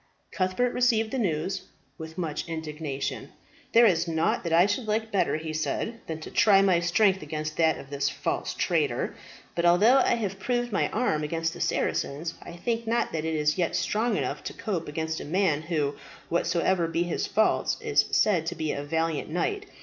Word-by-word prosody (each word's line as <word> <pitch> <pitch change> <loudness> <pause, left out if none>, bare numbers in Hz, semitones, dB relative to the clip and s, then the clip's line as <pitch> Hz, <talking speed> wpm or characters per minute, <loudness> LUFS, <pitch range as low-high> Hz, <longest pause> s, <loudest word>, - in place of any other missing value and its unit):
Cuthbert 190 +6 0
received 225 -3 +2
the 265 - -1
news 185 -1 -1 0.4
with 160 0 -8
much 160 -4 -3
indignation. 155 -3 -4 0.4
"There 235 +1 +7
is 170 -5 +3
nought 165 0 0
that 170 - -3
I 170 +2 +6
should 205 +3 -1
like 220 +1 -1
better," 195 -5 +1
he 155 0 -5
said, 220 +8 -2
"than 160 -1 -4
to - - -8
try 200 -3 +5
my 185 -3 +4
strength 190 +3 +3
against 155 0 -4
that 160 -1 +3
of 135 - -11
this 140 0 0
false - - -3
traitor. - - 0 0.4
But 170 - -1
although 195 +9 +6
I 260 - +3
have 200 -4 -3
proved 240 +3 -1
my 200 - +1
arm 210 -10 0
against 165 +2 -1
the - - -8
Saracens, 160 +4 -1
I - - -9
think 230 +6 -3
not 235 +1 +1
that 160 -1 -3
it 160 0 -1
is 150 +3 +1
yet 170 - +1
strong 220 0 0
enough - - -3
to - - -4
cope 185 -6 -3
against 160 +1 -3
a - - -6
man 165 -2 +1
who, 155 -3 -1 0.3
whatsoever 170 +1 +1
be 165 +1 0
his 175 - -2
faults, 220 +1 +2
is 440 -2 +2
said 175 -6 +2
to 175 - -2
be 155 -2 -2
a 140 - -3
valiant 160 +1 -1
knight. 405 - -2
170 Hz, 195 wpm, -27 LUFS, 160-215 Hz, 0.4 s, There